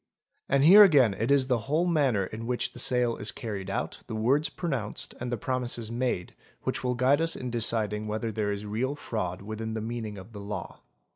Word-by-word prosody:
And 140 0 +3
here 195 +7 +10
again 140 - +5
it 115 +4 -2
is 140 -2 +4
the 125 -2 +1
whole 160 +4 +2
manner 140 - +2
in 110 +4 -7
which 125 0 -1
the - - -6
sale 125 -1 +2
is 105 - -2
carried 100 -4 -5
out, 95 - -3
the - - -5
words 130 +8 +2
pronounced 135 - -3
and 125 0 -4
the 120 - -1
promises 120 -2 -2
made, 120 -7 -2 0.3
which - - -2
will 125 0 0
guide 130 +5 +3
us 165 0 0
in 125 -1 -5
deciding 110 -2 -1
whether 110 +1 -2
there 105 -1 -1
is 100 +1 -4
real 120 +7 -2
fraud 95 -9 -4
within 110 +1 -5
the - - -2
meaning 110 -2 -5
of 95 +4 -11
the 100 - -7
law. 105 +1 -6
115 Hz, 210 wpm, -28 LUFS, 105-130 Hz, 0.3 s, here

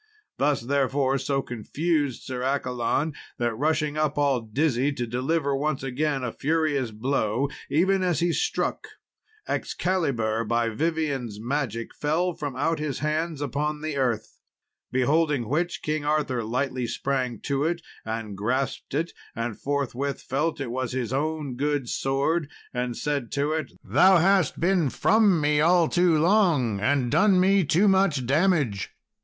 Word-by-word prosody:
This, 145 -1 +2
therefore, 135 +1 +1
so 135 +1 -1
confused 145 +4 -1
Sir 125 -1 -5
Accolon, 130 +2 0 0.2
that 120 -1 0
rushing 150 +4 0
up, 150 -1 0
all 140 -4 +2
dizzy, 130 +4 0
to 125 -3 -3
deliver 140 +5 0
once 145 0 -1
again 135 +1 -1
a 125 - -2
furious 150 -4 0
blow, 120 +2 -1 0.2
even 190 +5 +2
as 180 -3 +1
he 170 0 +1
struck, 350 - -1 0.6
Excalibur, 125 -12 -1
by 115 +1 0
Vivien's 140 -5 -2
magic, 120 -2 -3
fell 170 +5 0
from 145 -4 -5
out 165 +4 0
his 150 -3 -2
hands 155 +2 -2
upon 150 +2 -2
the 155 -2 -3
earth. 125 -5 -1 0.5
Beholding 140 0 +2
which, 170 +6 -1
King 155 -1 -1
Arthur 145 -5 0
lightly 125 +2 -2
sprang 125 -2 -2
to 140 0 -1
it, 170 +1 -1 0.2
and 110 -2 -4
grasped 130 +7 -2
it, 165 +3 -1 0.2
and 115 -1 -3
forthwith 140 -1 -2
felt 150 +4 -1
it 135 -4 -3
was 130 0 -3
his 125 -2 -2
own 150 -1 -2
good 145 -1 -1
sword, 140 +5 0 0.2
and 125 -1 -2
said 140 -6 -2
to 145 +2 0
it, 155 -3 -2
"Thou 190 0 +5
hast 190 0 +3
been 175 -4 +2
from 205 - +3
me 150 0 +2
all 170 +1 +4
too 175 -1 +3
long, 160 - +3
and 125 +3 +1
done 185 +5 +4
me 195 +1 +4
too 170 +7 +3
much 190 -9 +3
damage." 140 - +1
140 Hz, 150 wpm, -25 LUFS, 125-160 Hz, 0.6 s, Thou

